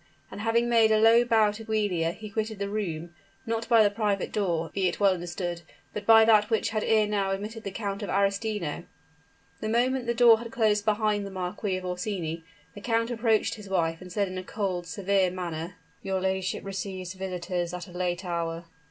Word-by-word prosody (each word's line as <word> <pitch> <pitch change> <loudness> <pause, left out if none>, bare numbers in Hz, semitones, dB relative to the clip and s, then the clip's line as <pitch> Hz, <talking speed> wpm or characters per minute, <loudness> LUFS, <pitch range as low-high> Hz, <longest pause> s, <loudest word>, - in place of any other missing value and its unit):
And - - -7
having 230 +2 +2
made 230 -2 +5
a 215 - +5
low 225 +2 +6
bow 220 -3 +3
to 215 +2 -9
Giulia, 205 -7 0
he 215 +3 -9
quitted 220 0 -2
the 200 0 -3
room 175 -5 -3 0.3
not 230 0 -2
by 230 -2 +7
the 205 - +3
private 205 -2 -1
door, 170 -6 -1
be 190 -2 +1
it 175 - -3
well 200 -2 +5
understood, 175 -1 -4 0.3
but 205 -1 -6
by 225 -1 +8
that 215 -2 +5
which 225 -1 +1
had 215 -1 -1
ere 220 -1 +3
now 205 -2 0
admitted 210 +3 -4
the - - -3
Count 200 0 -4
of 205 - -4
Arestino. 200 -3 -1 0.7
The 215 - -3
moment 245 +2 +1
the 235 - 0
door 235 -2 +7
had 235 0 -8
closed 210 -2 +2
behind 215 -1 +1
the 200 - -6
Marquis 190 +1 -3
of 185 - -7
Orsini, 180 -3 -3 0.3
the 205 - -10
count 230 +1 0
approached 225 -2 +1
his 210 -3 -10
wife, 165 -3 0
and 180 0 -10
said 200 +1 0
in 185 0 -5
a - - -6
cold, 185 -3 -3
severe 195 +1 +1
manner: 175 -1 -5 0.3
"Your 190 -1 -1
ladyship 190 0 -2
receives 190 -1 -5
visitors 180 -2 -3
at 180 +1 -6
a - - -13
late 180 +1 -2
hour." 170 -1 -3
200 Hz, 205 wpm, -27 LUFS, 180-220 Hz, 0.7 s, by